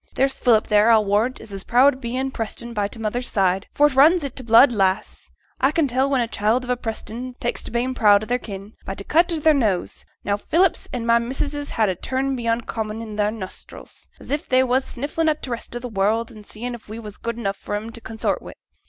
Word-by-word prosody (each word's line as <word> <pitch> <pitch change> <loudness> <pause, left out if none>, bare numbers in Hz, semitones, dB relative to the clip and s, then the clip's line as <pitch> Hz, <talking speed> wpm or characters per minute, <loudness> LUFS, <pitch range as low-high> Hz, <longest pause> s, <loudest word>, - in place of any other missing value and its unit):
There's 270 0 +1
Philip 225 -4 +4
there, 210 +1 +4
I'll 220 -2 +5
warrant, 215 +6 +1
is 205 - -11
as 195 -1 -5
proud 260 +4 +5
o' 260 - -12
bein' 260 +2 -3
Preston 235 0 -5
by 205 -2 0
t' 215 - -12
mother's 225 +3 -2
side, 195 -1 +1
for 290 - +4
it 295 - +3
runs 305 +6 +5
i' - - -2
t' 260 - -10
blood, 240 +2 +6
lass. 195 -1 -1 0.3
A 270 - +3
can 315 -1 +2
tell 260 +2 +1
when 270 -3 +2
a 235 - 0
child 220 +3 0
of 250 - -3
a - - +2
Preston 240 +1 -6
tak's 240 - -2
to - - -7
being 245 +2 -1
proud 210 -4 +5
o' - - -4
their 245 +3 0
kin, 200 -2 -8
by 195 - -5
t' 200 - -6
cut 335 - +3
o' 325 - -1
their 310 +1 +5
nose. 215 -10 -1 0.2
Now 200 0 0
Philip's 345 - +1
and 240 -2 -3
my 235 0 +4
missus's 285 +4 -3
has 220 -2 +1
a 190 - +1
turn 265 +8 -2
beyond 230 -1 -1
common 220 -1 -4
i' 220 -2 -7
their 210 0 +1
nostrils, 210 -4 -9
as - - -10
if 290 +1 -2
they 255 0 +4
was 260 +1 +1
sniffin' 300 +5 -1
at 305 - -2
t' 255 - -5
rest 235 0 -5
of 240 +1 -5
us 245 - -6
world, 220 +3 0
an' 215 -2 -12
seein' 240 +4 -6
if 230 -3 -11
we 215 - -6
was 210 -3 -9
good 235 0 -4
enough 195 -4 -2
for - - -5
'em 220 +2 -5
to 230 - -12
consort 220 0 -2
wi'. - - -10
235 Hz, 255 wpm, -22 LUFS, 215-260 Hz, 0.3 s, blood